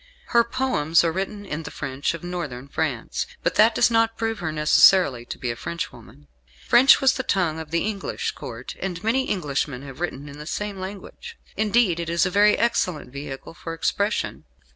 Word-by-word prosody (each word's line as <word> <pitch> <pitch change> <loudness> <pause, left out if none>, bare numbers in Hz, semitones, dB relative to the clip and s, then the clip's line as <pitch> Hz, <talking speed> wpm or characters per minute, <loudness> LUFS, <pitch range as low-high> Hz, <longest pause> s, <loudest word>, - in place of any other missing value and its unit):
Her 235 -1 +5
poems 230 - +1
are 165 - +1
written 195 +3 -4
in 160 -4 -4
the - - -7
French 135 +4 -3
of 170 - -10
northern 150 -8 -5
France; 140 -5 -2 0.2
but - - +1
that 220 +1 +5
does - - +4
not 225 0 +2
prove 225 -1 -2
her 165 -4 -2
necessarily 150 -3 +5
to - - -7
be 125 - -2
a - - -5
Frenchwoman. 115 - -7 0.4
French 260 +3 +7
was 270 - +5
the - - -2
tongue 175 -9 0
of 160 -1 -7
the 170 +3 0
English 210 -2 -3
Court, - - -8
and 180 -3 -4
many 260 +4 +1
Englishmen 140 -6 -2
have 135 0 -10
written 150 -5 -4
in 145 0 -10
the 150 - -8
same 205 +1 -4
language. 200 - -8 0.2
Indeed, 215 -5 +2
it 170 -1 -3
is 170 +2 +2
a 185 - -1
very 210 +2 +5
excellent 180 - 0
vehicle 140 +1 -7
for 165 -1 -7
expression. 200 +5 -1
175 Hz, 190 wpm, -24 LUFS, 150-210 Hz, 0.4 s, French